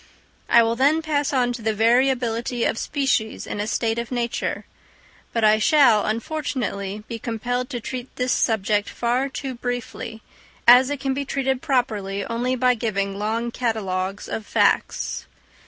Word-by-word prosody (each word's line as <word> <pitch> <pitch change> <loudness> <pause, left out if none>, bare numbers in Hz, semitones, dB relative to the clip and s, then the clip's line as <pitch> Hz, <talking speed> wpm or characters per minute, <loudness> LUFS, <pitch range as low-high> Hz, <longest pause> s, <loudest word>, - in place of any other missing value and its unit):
I 235 - +7
will 230 0 +1
then 290 +6 +3
pass 290 -2 0
on 250 -3 +1
to 240 - -7
the 220 0 0
variability 240 0 +2
of - - 0
species 265 -6 -1
in - - -5
a 210 - -2
state 225 0 0
of 235 +1 -5
nature; 240 -1 -2 0.7
but 230 - -1
I 215 0 +5
shall, 240 -4 +5
unfortunately, 220 - -3
be 230 - -5
compelled 245 +3 -3
to 245 - -4
treat 250 +2 -6
this 250 0 -1
subject 210 -3 +1
far 245 +3 0
too 270 0 -5
briefly, 245 -2 -5 0.4
as 250 +2 +8
it 290 -1 -3
can 270 -1 -1
be 280 +1 -2
treated 265 -1 -1
properly 215 -9 -1
only 245 +2 -1
by 250 0 +3
giving 200 -4 -2
long 225 +3 -1
catalogues 200 -5 -2
of 220 - -5
facts. - - +1
235 Hz, 155 wpm, -23 LUFS, 220-255 Hz, 0.7 s, as